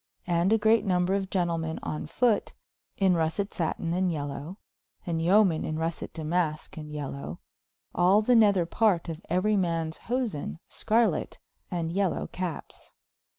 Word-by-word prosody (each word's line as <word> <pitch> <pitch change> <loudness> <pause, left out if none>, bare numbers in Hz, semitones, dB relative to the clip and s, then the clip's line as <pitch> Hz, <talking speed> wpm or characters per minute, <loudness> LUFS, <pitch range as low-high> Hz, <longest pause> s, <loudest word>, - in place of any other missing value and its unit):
And 175 +2 +2
a 225 - +5
greate 220 +1 +4
nomber 180 -2 +1
of 195 -1 -2
Gentlemen 165 -4 -1
on 150 0 -4
fote, 220 +6 +1 0.4
in 190 -2 +4
russet 170 +5 0
satyn 165 0 -2
and 185 +1 +1
yealow, 145 +3 -5 0.5
and 165 -3 -1
yomen 180 -1 +4
in 155 - -3
russet 165 0 -3
Damaske 160 -1 -2
and 150 -1 -8
yealow, 140 - -5 0.6
all 190 +5 +4
the 245 +3 +4
nether 200 -6 +5
parte 180 -2 +1
of 165 +1 -6
euery 195 +5 +2
mans 165 -3 -1
hosen 235 - -2
Skarlet, 220 -6 +1 0.3
and 170 -2 -2
yealow 195 0 0
cappes. 180 -3 -6
175 Hz, 145 wpm, -28 LUFS, 160-200 Hz, 0.6 s, a